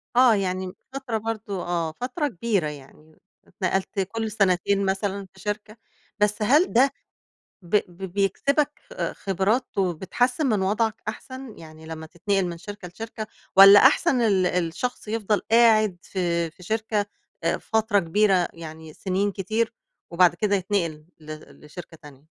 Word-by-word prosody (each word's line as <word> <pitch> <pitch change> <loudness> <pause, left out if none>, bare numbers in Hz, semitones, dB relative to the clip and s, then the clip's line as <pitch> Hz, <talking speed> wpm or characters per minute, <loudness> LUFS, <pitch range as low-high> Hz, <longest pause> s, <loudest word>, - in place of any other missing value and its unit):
آه، 250 -3 +6
يعني 185 -1 -2
م 185 - -8 0.2
فترة 265 -5 -3
برضه 215 -4 -4
آه، 170 -2 -1
فترة 255 - -3
كبيرة 200 - -1
يعني، 150 +2 -12 0.3
اتنقلت 190 +1 -2
كل 220 +3 -2
سنتين 200 0 +2
مثلًا 195 0 -2
في 190 - -18
شركة، 210 +2 -5 0.4
بس 210 +1 +1
هل 290 - +3
ده 265 +3 +5 0.7
ب 175 +4 +1
ب 175 +2 -16
بيكسبك 280 - 0
خ - - -3
خبرات 200 +5 -1
وبتحسّن 195 - 0
من 210 -6 +1
وضعك 215 +3 0
أحسن؟ 260 +2 -8
يعني 160 0 -13
لمّا 160 0 -7
تتنقل 190 +3 -1
من 170 -1 -5
شركة 205 -1 -9
لشركة، 220 +3 -7 0.3
والّا 195 +1 +10
أحسن 265 0 +4
ال 195 -5 +3
الشخص 180 +7 -2
يفضل 215 -2 0
قاعد 220 -4 +5
في 170 -3 -1
في 180 - -19
شركة 215 +1 -1 0.4
آآ، 165 - +1
فترة 220 -2 +1
كبيرة 185 +1 +2
يعني 160 -1 -10
سنين 195 +1 -1
كتير 220 +5 -1 0.4
وبعد 175 0 +4
كده 205 +2 +1
يتنقل 175 -6 -2 0.2
ل 155 0 -7 0.3
لشركة 165 +2 -11
تانية؟ 140 -2 -14
200 Hz, 145 wpm, -24 LUFS, 175-220 Hz, 0.7 s, والّا